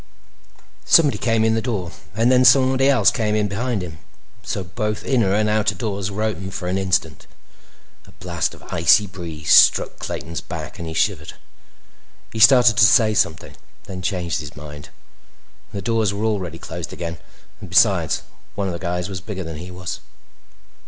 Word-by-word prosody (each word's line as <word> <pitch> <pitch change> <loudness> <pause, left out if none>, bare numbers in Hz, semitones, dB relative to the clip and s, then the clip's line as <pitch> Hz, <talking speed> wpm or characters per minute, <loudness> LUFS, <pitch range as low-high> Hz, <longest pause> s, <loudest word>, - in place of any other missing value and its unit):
Somebody 150 -4 +4
came 115 -2 +1
in 110 - +2
the 115 - 0
door 100 -8 -3 0.2
and 115 +3 +2
then 130 0 +5
somebody 130 +1 +4
else 135 - +4
came 110 -3 -1
in 105 -1 +1
behind 110 0 -3
him, 80 -3 -9 0.4
so 100 -2 -4
that 90 0 -18
both 105 -1 -3
inner 115 -8 +1
and 110 0 +1
outer 105 -1 +1
doors 100 -1 -3
were 105 +2 -4
open 95 -3 -3
for 90 -1 -6
an 95 +2 -1
instant. 90 -6 -1 0.8
A - - -16
blast - - -3
of - - -18
icy 85 +6 +4
breeze 85 -5 -6
struck - - +5
Clayton's 80 0 -5
back, - - -8
and 85 - -6
he 80 - -6
shivered. 80 -3 -1 1.0
He 110 - -4
started 120 -2 +6
to - - +6
say 110 +1 +5
something, 80 -6 -1 0.3
then 95 -1 -8
changed 90 - -2
his - - -9
mind; 75 0 -10 0.8
the 100 - -6
doors 110 -4 0
were 105 +2 -2
already 95 -7 -2
closed 85 0 -7
again, 85 -1 -6 0.4
and 100 -4 -10
besides, 95 -3 +3 0.3
one 100 - -2
of 95 - -3
the 85 - -6
guys 90 0 -3
was 95 -3 -6
bigger 95 -1 -6
than 80 -2 -7
he 90 +4 -9
was. 90 0 -6
100 Hz, 180 wpm, -21 LUFS, 85-110 Hz, 1.0 s, started